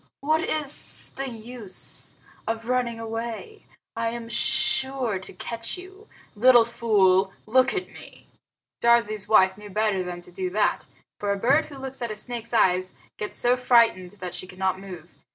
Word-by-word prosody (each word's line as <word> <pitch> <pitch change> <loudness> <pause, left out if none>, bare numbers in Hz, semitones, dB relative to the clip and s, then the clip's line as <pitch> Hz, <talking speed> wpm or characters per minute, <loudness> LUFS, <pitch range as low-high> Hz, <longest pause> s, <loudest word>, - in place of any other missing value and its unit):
What 310 +3 +2
is 300 -5 -1
the 270 0 -3
use 230 -3 -6 0.3
of 225 0 -3
running 245 -2 0
away? 230 - -6 0.3
I 230 0 0
am 230 0 -6
sure 265 -2 +2
to 185 - -7
catch 230 - -5
you. 380 +4 -13 0.3
Little 240 +1 +6
fool, 200 -5 +3
look 255 +4 +3
at 370 -1 -2
me!" - - -14 0.6
Darzee's 230 -3 +3
wife 190 -2 +5
knew 210 0 -10
better 210 -1 +1
than 180 -1 -5
to 175 - -13
do 185 0 -3
that, 205 +3 0 0.3
for 205 -1 -1
a 200 - 0
bird 270 +9 +3
who 285 - -11
looks 265 -1 -7
at 235 - -2
a 215 - -4
snake's 235 +1 -4
eyes 185 -5 +2 0.2
gets 210 - -5
so 245 +1 +3
frightened 235 -7 +3
that 185 -3 -7
she 185 - -5
cannot 185 0 -2
move. 180 -4 -10
230 Hz, 165 wpm, -25 LUFS, 195-255 Hz, 0.6 s, Little